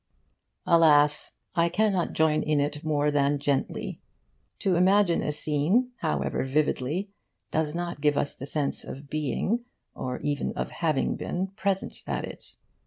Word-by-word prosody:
Alas, 150 -3 +5 0.2
I 170 -1 +2
cannot 195 -1 +1
join 155 -1 +3
in 150 -1 +1
it 145 +1 -2
more 150 -1 +1
than 145 0 +2
gently. 140 -1 -2 0.6
To 190 -2 +1
imagine 185 0 +4
a - - -1
scene, 155 - +2
however 70 -2 -1
vividly, 150 +6 0 0.4
does 155 0 0
not 175 -3 -4
give 145 -1 +2
us 145 - 0
the 135 - -7
sense 145 -1 -1
of 140 +1 -9
being, 155 - -1 0.3
or 125 -1 -4
even 145 -1 -1
of - - -4
having 155 -5 0
been, 185 +2 -3
present 195 -1 -1
at - - -2
it. - - -10
155 Hz, 145 wpm, -27 LUFS, 145-175 Hz, 0.6 s, Alas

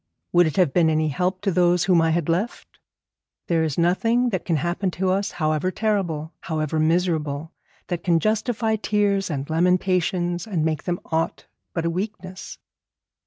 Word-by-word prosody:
Would 175 -1 +5
it 155 - -3
have 180 -8 +3
been 165 -2 +4
any 155 0 +1
help 180 +6 -1
to 200 -1 0
those 175 -1 +3
whom 180 -3 +4
I 165 - +2
had 165 -1 0
left? 180 +8 -3 0.7
There 165 -2 +1
is 155 -3 -2
nothing 225 +8 +2
that 190 -5 -3
can 170 - +1
happen 175 +5 -1
to 185 +1 -1
us, 195 +2 -1
however 155 +1 0
terrible, 180 -7 -1
however 155 -1 -2
miserable, 160 -2 0 0.3
that 175 -2 -4
can 170 -2 +3
justify 220 +2 0
tears 205 -2 +1
and 140 -3 -3
lamentations 180 +2 +1
and 170 -7 -1
make 155 -1 -2
them 175 -1 -2
aught 160 0 -1 0.3
but 165 -1 -2
a 170 - +1
weakness.' 185 0 -6
175 Hz, 165 wpm, -23 LUFS, 160-190 Hz, 0.7 s, Would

